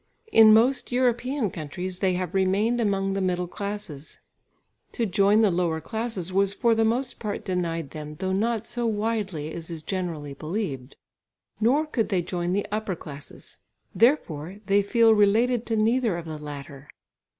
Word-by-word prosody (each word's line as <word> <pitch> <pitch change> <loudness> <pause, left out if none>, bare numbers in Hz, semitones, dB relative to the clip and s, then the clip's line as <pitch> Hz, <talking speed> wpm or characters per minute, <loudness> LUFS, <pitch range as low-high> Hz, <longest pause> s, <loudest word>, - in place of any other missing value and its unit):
In 220 - +8
most 245 +5 +3
European 245 -2 +1
countries 180 +4 -6
they 190 -2 +2
have 180 -2 -3
remained 200 +5 +2
among 195 -2 0
the 195 - -1
middle 180 -1 0
classes; 200 -6 -7 0.7
to 235 - 0
join 200 +2 +3
the 205 - +4
lower 170 -2 0
classes 220 -3 -4
was 195 +1 +2
for 235 +1 +3
the 225 0 +2
most 245 +3 -1
part 210 -2 -4
denied 170 -5 -2
them, 150 -1 -7
though 190 +4 -3
not 220 +2 0
so 240 -1 -1
widely 205 -8 -2
as 165 0 -6
is 165 -2 -7
generally 165 -7 -4
believed. 145 - -4 0.6
Nor 265 +8 +3
could 245 -7 -1
they 185 -4 +1
join 175 0 -2
the 200 +2 0
upper 210 -3 -2
classes; 145 -3 -10 0.3
therefore 190 - +1
they 200 +1 +3
feel 225 +2 +4
related 220 +3 +3
to 225 - 0
neither 225 -2 +2
of 170 - -6
the 155 -2 -6
latter. 145 -1 -9
195 Hz, 160 wpm, -25 LUFS, 170-225 Hz, 0.7 s, In